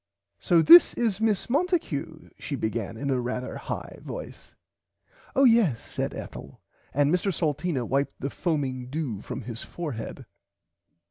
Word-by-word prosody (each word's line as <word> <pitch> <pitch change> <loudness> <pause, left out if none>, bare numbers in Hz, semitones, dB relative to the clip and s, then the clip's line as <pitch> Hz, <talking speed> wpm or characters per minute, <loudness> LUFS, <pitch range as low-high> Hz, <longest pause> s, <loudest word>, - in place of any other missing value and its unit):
So 170 -4 +3
this 345 - +9
is 220 -4 0
Miss 215 -3 +1
Monticue 250 - -1
she 145 - -4
began 110 -2 -3
in 140 +3 -2
a 130 -2 +1
rarther 125 +1 -4
high - - -6
voice. - - -9 0.8
Oh 275 - +4
yes 225 - +4
said - - -4
Ethel - - -9 0.3
and 145 +3 +2
Mr 180 +2 +1
Salteena 150 -5 -1
wiped 140 +4 -1
the 140 +1 -3
foaming 130 -7 -2
dew 135 -8 -3
from - - -6
his 115 0 -6
forehead. 145 -10 -6
145 Hz, 140 wpm, -26 LUFS, 125-185 Hz, 0.8 s, this